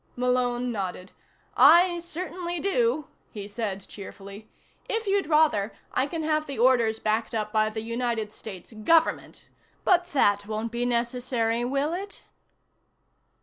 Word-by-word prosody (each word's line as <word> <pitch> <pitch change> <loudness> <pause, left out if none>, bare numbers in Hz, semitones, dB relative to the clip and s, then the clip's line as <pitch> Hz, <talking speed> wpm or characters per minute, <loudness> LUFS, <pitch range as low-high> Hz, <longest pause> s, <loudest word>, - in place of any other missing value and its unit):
Malone 250 0 0
nodded. 190 -3 -5 0.4
"I 345 0 +6
certainly 345 0 -4
do," 285 -6 +1 0.2
he 205 -2 -7
said 205 -2 -4
cheerfully. 200 +1 -10 0.4
"If 450 0 -1
you'd 395 -3 +1
rather, 300 -10 +3 0.2
I 260 - +1
can 320 +2 -4
have 310 0 0
the 275 - -5
orders 235 -2 +3
backed 220 +2 -1
up 215 0 -2
by 215 0 +3
the 220 0 -5
United 230 -2 -2
States 200 -1 -10
Government. 320 +10 +1 0.4
But 355 -1 +3
that 205 -7 +2
won't 220 +1 -3
be 240 +1 -1
necessary, 240 -1 0
will 275 +5 0
it?" 395 +3 -6
240 Hz, 135 wpm, -26 LUFS, 215-310 Hz, 0.4 s, I